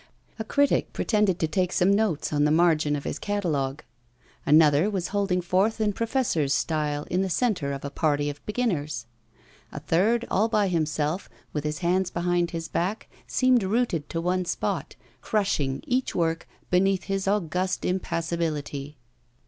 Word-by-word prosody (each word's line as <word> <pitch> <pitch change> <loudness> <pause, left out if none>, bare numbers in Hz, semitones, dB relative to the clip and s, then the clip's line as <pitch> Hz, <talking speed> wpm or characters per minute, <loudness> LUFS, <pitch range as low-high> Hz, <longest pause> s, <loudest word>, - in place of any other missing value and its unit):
A - - -1
critic 285 +5 +1
pretended 210 -5 +1
to 160 - 0
take 180 +3 0
some 190 +2 +3
notes 200 -9 0
on 145 0 +2
the 150 - +3
margin 155 -2 +3
of 140 - -4
his - - -4
catalogue; 160 -9 -2 0.6
another 150 +4 +5
was 190 -4 -2
holding 195 -3 0
forth 190 +6 +1
in 210 -1 +1
professor's 220 - 0
style 150 -2 -1
in 180 +2 +2
the 190 - -1
centre 185 - 0
of 140 0 -5
a 140 - -4
party 145 -1 +1
of 145 0 -6
beginners; 165 - -1 0.7
a - - -6
third, 225 +8 +1
all 210 +4 +3
by 210 -3 +2
himself, 155 0 -1 0.2
with 150 - -2
his 150 0 -2
hands 185 +1 +2
behind 175 0 0
his 165 -1 -5
back, 190 +8 -2 0.2
seemed 255 -2 +3
rooted 195 -6 0
to 165 - -2
one 180 +2 0
spot, 175 - -3 0.3
crushing 175 - 0
each 255 +1 -1
work 165 -1 0 0.2
beneath 190 +1 +3
his 195 -1 -2
august 185 -1 0
impassibility. 160 -5 -2
175 Hz, 155 wpm, -26 LUFS, 150-200 Hz, 0.7 s, another